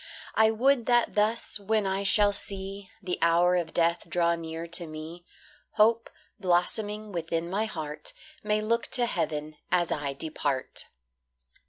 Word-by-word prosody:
I 220 0 +5
would 245 +2 +2
that 240 -1 +3
thus, 215 +1 0
when 210 +1 0
I 190 +1 0
shall 205 +1 +4
see 195 -1 -3
The 180 -1 -2
hour 170 +2 +4
of 170 -3 -1
death 170 0 +1
draw 170 0 +2
near 165 0 -5
to 170 0 +1
me, 160 +3 -8 0.5
Hope, 225 +1 +3 0.3
blossoming 205 +3 +1
within 165 -1 -2
my 200 +5 -1
heart, 155 -7 -6 0.3
May 210 0 +1
look 230 +2 0
to 245 - +2
heaven 155 -7 -3
as 175 -1 +2
I 145 -2 -2
depart. 145 -2 -2
180 Hz, 145 wpm, -28 LUFS, 165-215 Hz, 0.5 s, I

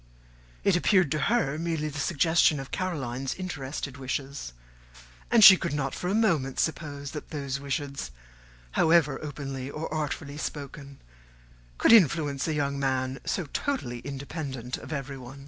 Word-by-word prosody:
It 200 - +4
appeared 180 -3 +3
to 155 - +1
her 155 -11 +1
merely 165 -2 -1
the 145 -1 -5
suggestion 160 -1 +3
of 135 - -8
Caroline's 135 -8 -3
interested 145 -6 -5
wishes; 135 - -4 0.8
and 230 -2 +6
she 190 - +12
could 170 -5 -3
not 135 -2 -1
for 180 - -4
a 195 - +1
moment 165 - +1
suppose 145 -3 -2
that 150 - -7
those 140 -3 -3
wishes, 140 - -3 0.6
however 160 - +3
openly 135 -2 -5
or 155 +2 -5
artfully 145 -1 -3
spoken, 140 -2 -6 0.8
could - - +4
influence 150 - +4
a 160 - 0
young 140 -1 -1
man 130 -1 -1
so 180 - -1
totally 190 - -2
independent 135 -2 -5
of - - -10
everyone. 135 -2 -6
145 Hz, 145 wpm, -27 LUFS, 135-160 Hz, 0.8 s, she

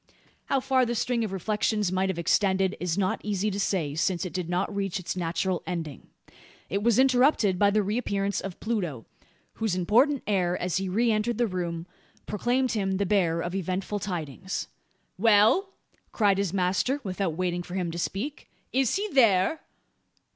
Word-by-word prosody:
How 275 - +1
far 260 0 +2
the 240 0 -1
string 235 0 0
of 215 - -3
reflections 210 +1 0
might 190 +1 +1
have 190 - -2
extended 190 +2 +2
it - - -10
is 180 0 -1
not 190 -2 0
easy 205 0 -1
to 200 - -3
say: 170 -8 0
since 175 +4 0
it 180 - -6
did 180 -2 -3
not 180 +3 -1
reach 195 -2 -1
its 170 -1 -4
natural 180 +1 -1
ending. 165 -6 -5 0.6
It 200 +2 -1
was 230 0 +3
interrupted 250 -7 +4
by 205 - +5
the 210 +1 +2
reappearance 200 -2 -1
of 190 -2 -7
Pluto; 180 - -3 0.6
whose 220 -5 +1
important 240 - +3
air, 180 -4 +1
as 180 -1 -1
he 190 0 -2
re 230 +5 +2
entered 215 +1 0
the 240 - +2
room, 170 -4 -3 0.4
proclaimed 245 +4 0
him 195 -3 0
the 200 +1 0
bearer 175 -4 +1
of 175 - -4
eventful 190 +2 -2
tidings. 180 -2 -4 0.5
"Well!" 225 - +5 0.4
cried 200 -3 +2
his 200 -4 0
master, 195 +9 +1
without 185 -4 -2
waiting 180 -1 -1
for 175 +1 -8
him 180 -3 -1
to 170 - -5
speak, 235 - -4 0.2
"is 265 -2 +2
he 405 +3 -1
there?" 230 - +3
195 Hz, 175 wpm, -27 LUFS, 180-220 Hz, 0.6 s, by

